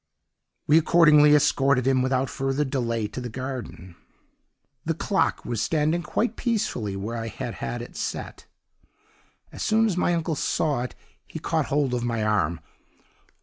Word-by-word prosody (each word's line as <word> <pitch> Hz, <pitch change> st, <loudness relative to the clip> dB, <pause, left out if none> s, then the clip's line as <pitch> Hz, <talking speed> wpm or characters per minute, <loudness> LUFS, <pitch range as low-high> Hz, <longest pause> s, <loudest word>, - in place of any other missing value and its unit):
"We 155 Hz, +2 st, +6 dB
accordingly 150 Hz, -3 st, +6 dB
escorted 140 Hz, -3 st, +3 dB
him 130 Hz, -1 st, +3 dB
without 130 Hz, +1 st, +1 dB
further 135 Hz, +2 st, -1 dB
delay 115 Hz, -5 st, -1 dB
to 120 Hz, +5 st, -6 dB
the 125 Hz, -, -5 dB
garden. 120 Hz, -8 st, -7 dB, 0.9 s
"The -, -, -1 dB
clock -, -, 0 dB
was 115 Hz, -3 st, -2 dB
standing 155 Hz, +5 st, +1 dB
quite 230 Hz, +5 st, -1 dB
peacefully 215 Hz, -, -2 dB
where 105 Hz, +4 st, -4 dB
I 115 Hz, 0 st, -4 dB
had -, -, -5 dB
had 60 Hz, -1 st, -3 dB
it -, -, -12 dB
set. -, -, -5 dB, 1.0 s
"As -, -, -9 dB
soon 220 Hz, +1 st, +3 dB
as 195 Hz, -5 st, 0 dB
my 175 Hz, -1 st, +2 dB
uncle 165 Hz, 0 st, -1 dB
saw 145 Hz, -2 st, 0 dB
it 125 Hz, -, -5 dB, 0.3 s
he -, -, -8 dB
caught 160 Hz, -2 st, -1 dB
hold 140 Hz, -3 st, 0 dB
of 120 Hz, -1 st, -1 dB
my 115 Hz, -2 st, -1 dB
arm. 100 Hz, -6 st, 0 dB
135 Hz, 155 wpm, -25 LUFS, 115-155 Hz, 1.0 s, We